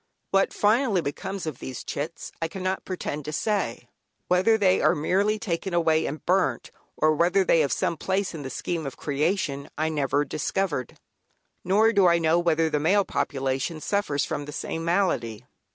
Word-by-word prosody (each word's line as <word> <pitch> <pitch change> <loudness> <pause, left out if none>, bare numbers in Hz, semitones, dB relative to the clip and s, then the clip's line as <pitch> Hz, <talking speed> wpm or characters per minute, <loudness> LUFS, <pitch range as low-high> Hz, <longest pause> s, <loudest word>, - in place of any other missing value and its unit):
What 195 0 +3
finally 215 -2 +2
becomes 190 +6 -4
of 155 -5 -5
these 130 -2 -6
"chits" 155 +4 -5
I 165 - 0
cannot 185 +2 -3
pretend 150 -5 -4
to 155 - -4
say; 155 - -1 0.4
whether 190 +5 +4
they 190 -3 +3
are - - +4
merely 200 +8 +1
taken 190 -3 -3
away 160 -2 +2
and 150 - -6
burnt, 180 -10 +1 0.3
or 155 0 +3
whether 175 +5 +3
they 165 - +3
have 145 -3 +2
some 170 - 0
place 190 +3 -1
in 160 - -6
the 135 - -5
scheme 160 +3 -3
of 135 - -7
creation, 145 -1 -1
I 155 +1 0
never 145 -1 0
discovered. 150 -2 -2 0.7
Nor 215 +5 +3
do 200 -3 +5
I 170 0 +5
know 165 0 +3
whether 165 -2 +2
the 150 -2 0
male 195 +6 +3
population 135 +1 -2
suffers 155 -6 0
from 145 - -4
the 150 - -7
same 165 +1 -4
malady. 165 - 0
165 Hz, 175 wpm, -25 LUFS, 145-190 Hz, 0.7 s, do